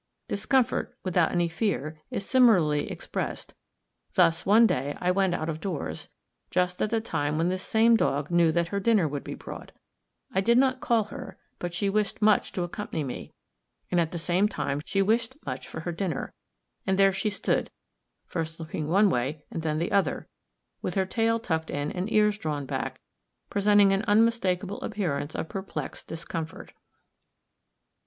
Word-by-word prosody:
Discomfort, 235 Hz, +5 st, +1 dB
without 180 Hz, -3 st, +2 dB
any 175 Hz, -1 st, +2 dB
fear, 160 Hz, -4 st, -2 dB
is 200 Hz, -, -3 dB
similarly 190 Hz, -, +4 dB
expressed: -, -, -5 dB, 0.6 s
thus, 165 Hz, +1 st, +3 dB
one 220 Hz, +4 st, +7 dB
day 145 Hz, -, 0 dB
I 180 Hz, -, +2 dB
went 190 Hz, -1 st, +2 dB
out 155 Hz, -, -3 dB
of 160 Hz, -1 st, -4 dB
doors, 185 Hz, -7 st, -4 dB, 0.4 s
just 180 Hz, 0 st, 0 dB
at 215 Hz, -, +1 dB
the 225 Hz, +1 st, +1 dB
time 150 Hz, -9 st, -1 dB
when 165 Hz, +2 st, +2 dB
this 185 Hz, 0 st, -2 dB
same 225 Hz, +3 st, +4 dB
dog 145 Hz, -7 st, 0 dB
knew 170 Hz, -1 st, +4 dB
that 170 Hz, +1 st, 0 dB
her 200 Hz, -, -1 dB
dinner 200 Hz, -5 st, +3 dB
would 145 Hz, -1 st, -4 dB
be -, -, -6 dB
brought. -, -, -9 dB, 0.6 s
I 190 Hz, -, +2 dB
did 235 Hz, +4 st, +4 dB
not 260 Hz, 0 st, +3 dB
call 230 Hz, -2 st, +3 dB
her, 205 Hz, -, -9 dB, 0.2 s
but 175 Hz, -1 st, -4 dB
she 200 Hz, +3 st, 0 dB
wished 205 Hz, 0 st, 0 dB
much 215 Hz, -1 st, +3 dB
to 180 Hz, -, -1 dB
accompany 175 Hz, -3 st, -4 dB
me, 130 Hz, -, -6 dB, 0.6 s
and 175 Hz, -, +3 dB
at 160 Hz, -, -1 dB
the 175 Hz, -, -4 dB
same 180 Hz, +4 st, +2 dB
time 140 Hz, -8 st, -2 dB
she 195 Hz, 0 st, +1 dB
wished 230 Hz, +5 st, +1 dB
much -, -, -5 dB
for -, -, -6 dB
her 175 Hz, -, -3 dB
dinner; 170 Hz, 0 st, -3 dB, 0.5 s
and 190 Hz, 0 st, +2 dB
there 195 Hz, -1 st, +5 dB
she 195 Hz, +3 st, 0 dB
stood, 205 Hz, -, 0 dB, 0.6 s
first 160 Hz, 0 st, -4 dB
looking 155 Hz, -1 st, -4 dB
one 200 Hz, +6 st, +5 dB
way 140 Hz, +4 st, -2 dB
and 165 Hz, -, -3 dB
then 155 Hz, -1 st, -1 dB
the 170 Hz, +2 st, -1 dB
other, 195 Hz, -8 st, +1 dB, 0.5 s
with 180 Hz, -, -3 dB
her 190 Hz, -1 st, +2 dB
tail 225 Hz, +4 st, +1 dB
tucked 160 Hz, -8 st, -2 dB
in 145 Hz, +1 st, -2 dB
and 185 Hz, +4 st, -3 dB
ears 210 Hz, -1 st, +3 dB
drawn 150 Hz, -4 st, -3 dB
back, -, -, -3 dB, 0.5 s
presenting 205 Hz, 0 st, +5 dB
an 195 Hz, 0 st, +2 dB
unmistakable 205 Hz, -3 st, +2 dB
appearance 155 Hz, -9 st, -2 dB
of -, -, -3 dB
perplexed 190 Hz, +2 st, -6 dB
discomfort. 165 Hz, 0 st, -6 dB
185 Hz, 175 wpm, -27 LUFS, 160-210 Hz, 0.6 s, one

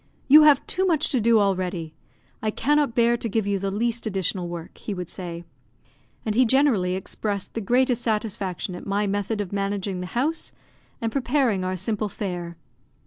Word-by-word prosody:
"You 300 Hz, +3 st, +9 dB
have 300 Hz, -3 st, +6 dB
too 375 Hz, -, -1 dB
much 320 Hz, -4 st, +2 dB
to 255 Hz, -, +1 dB
do 230 Hz, +1 st, +5 dB
already; 180 Hz, -5 st, -1 dB, 0.5 s
I 220 Hz, -, 0 dB
cannot 290 Hz, +2 st, +1 dB
bear 235 Hz, 0 st, +4 dB
to 230 Hz, -, -3 dB
give 220 Hz, 0 st, 0 dB
you 200 Hz, -1 st, 0 dB
the 195 Hz, +1 st, -2 dB
least 230 Hz, +3 st, -1 dB
additional 190 Hz, -2 st, -1 dB
work," 170 Hz, -1 st, -8 dB
he 205 Hz, -, -4 dB
would 180 Hz, -2 st, -6 dB
say. 175 Hz, -2 st, -6 dB, 0.8 s
And 215 Hz, -, 0 dB
he 250 Hz, +4 st, +5 dB
generally 230 Hz, -8 st, +3 dB
expressed 200 Hz, +1 st, -4 dB
the 225 Hz, -, -3 dB
greatest 245 Hz, +3 st, +2 dB
satisfaction 210 Hz, -5 st, -2 dB
at 180 Hz, -, -8 dB
my 200 Hz, +1 st, +1 dB
method 205 Hz, +2 st, -1 dB
of 200 Hz, -1 st, -6 dB
managing 195 Hz, -1 st, -2 dB
the 180 Hz, -, -5 dB
house, 310 Hz, +6 st, -1 dB, 0.5 s
and 225 Hz, -1 st, -1 dB
preparing 250 Hz, -6 st, +1 dB
our 185 Hz, 0 st, -1 dB
simple 210 Hz, +3 st, -2 dB
fare. 175 Hz, -4 st, -5 dB
205 Hz, 180 wpm, -24 LUFS, 185-235 Hz, 0.8 s, You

